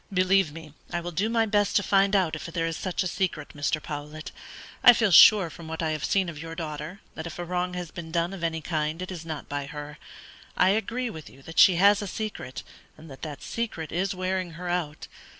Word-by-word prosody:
"Believe 185 -2 +3
me, 155 -1 -11 0.2
I 175 - -1
will 175 +1 -5
do 195 +7 0
my 230 -1 +2
best 205 -1 +1
to 205 - +4
find 195 +1 +3
it - - +7
out 175 -5 +1
if 155 - -7
there 165 0 -2
is 165 0 -2
such 185 +2 -2
a - - -1
secret, 185 0 -2
Mr. 145 +1 -1
Powlett. 150 +1 -7 0.5
I 245 - +10
feel 220 -4 +2
sure 190 0 +8
from 165 +1 -10
what 160 +1 -4
I 160 - 0
have 155 -2 -3
seen 195 -2 +1
of 160 -3 -7
your 165 0 -7
daughter, 155 +2 -6
that 160 - -6
if - - -8
a 175 - -4
wrong 180 +1 -2
has 180 -3 -5
been 170 -3 -8
done 170 +2 0
of 185 -3 -7
any 160 -1 -1
kind 155 0 -2
it 185 - -6
is 165 -3 -7
not 155 -3 -5
by 145 -1 -4
her. 150 +2 -8 0.6
I 185 - +5
agree 230 +4 -1
with 160 -5 -9
you 135 - -17
that 165 +3 -3
she 185 - +8
has 200 +4 +5
a 205 - -4
secret, 205 - -5 0.3
and 155 -2 -13
that 135 - -12
that 150 -3 -7
secret 210 -9 -4
is 190 +3 -1
wearing 185 -1 -2
her 175 +2 -6
out. 165 -4 -3
170 Hz, 240 wpm, -26 LUFS, 155-190 Hz, 0.6 s, I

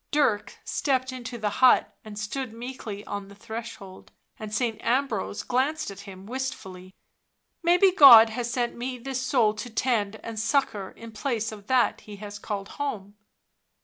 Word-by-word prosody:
Dirk 280 -9 +1
stepped 260 -2 0
into 250 -1 -7
the 215 -2 -2
hut 255 - +5
and 215 -1 -10
stood 220 +3 -4
meekly 230 -4 -7
on 200 -1 -5
the 200 - -14
threshold, 220 -3 -9 0.3
and 215 -1 -7
Saint 225 0 -1
Ambrose 235 -5 -1
glanced 265 +1 0
at 195 - -11
him 190 0 -11
wist 260 +4 -3
fully. 185 0 -12 0.3
" - - -53 0.3
Maybe 355 +3 +5
God 245 - +10
has 240 +1 -3
sent 240 -1 -1
me 250 +1 -4
this 260 +1 -4
soul 245 -5 +2
to 215 +3 -7
tend 220 -3 0
and 225 -1 -5
succour 220 -5 0
in 230 0 -12
place 225 -1 -2
of 205 -2 -11
that 255 -2 +2
He 210 - -10
has 205 0 -8
called 200 -2 -5
home." 205 -8 -4
230 Hz, 170 wpm, -26 LUFS, 205-260 Hz, 0.3 s, God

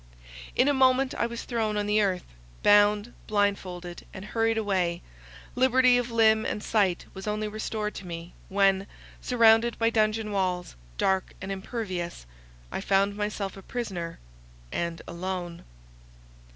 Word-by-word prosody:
In 255 - +4
a 290 - +4
moment 260 0 +3
I 235 - 0
was 235 0 -6
thrown 220 -3 -1
on 205 - 0
the 210 +1 +3
earth, 185 -3 0 0.4
bound, 205 +2 +5
blindfolded, 185 -4 -1
and 190 - -8
hurried 225 +1 +1
away 185 -5 0 0.5
—liberty 255 0 +5
of 245 0 -3
limb 220 -1 +4
and 210 - -3
sight 195 -5 +1
was 190 +1 -8
only 210 0 -1
restored 215 0 -3
to 185 - -8
me, 170 0 -7 0.2
when, 195 0 +3 0.3
surrounded 230 -1 +4
by 230 0 +2
dungeon 215 -1 +1
walls, 185 -3 -1 0.2
dark 190 -1 +1
and 190 +1 -5
impervious, 190 - -4 0.5
I - - -3
found 195 +1 +2
myself 205 -2 -3
a 195 - -10
prisoner 190 -7 -5 0.5
and 170 -1 -3
alone. 175 0 -5
205 Hz, 140 wpm, -27 LUFS, 190-225 Hz, 0.5 s, bound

